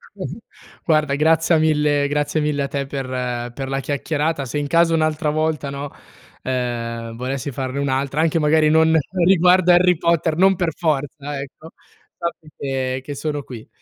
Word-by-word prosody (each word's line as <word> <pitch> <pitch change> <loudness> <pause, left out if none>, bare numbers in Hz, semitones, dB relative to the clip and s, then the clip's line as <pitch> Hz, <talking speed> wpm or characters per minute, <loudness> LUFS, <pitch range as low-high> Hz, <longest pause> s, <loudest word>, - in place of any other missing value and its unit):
Mh-mh. 185 - -6 0.5
Guarda, 155 -3 +2
grazia 160 +2 +3
mille 150 -2 +2
grazie 150 +2 0
mille 145 -2 0
a - - -2
te 140 -1 -3
per 135 -1 -5 0.5
per 135 +1 -5
la 135 0 -1
chiacchierata. 145 +1 -2
Se 130 - -4
in 145 -1 -2
caso 165 +1 +3
un'altra 155 -1 +1
volta, 155 -2 -1
no, 140 0 -6 0.5
ehm, 115 -2 -3
volessi 130 +3 -4
farne 130 +2 -4
un'altra, 140 +2 0
anche 165 0 +2
magari 155 0 +3
non 160 +1 +4 0.3
riguardo 180 0 +5
Harry 180 -1 +5
Potter, 165 -1 +1
non 190 +1 +5
per 170 -3 -1
forza, 145 -2 -2
ecco, 150 +4 -10 0.5
sappi 170 -2 -5
che 130 -1 -2
che 145 +1 -6
sono 145 -1 -3
qui. 120 -4 -10
150 Hz, 160 wpm, -20 LUFS, 135-160 Hz, 0.5 s, riguardo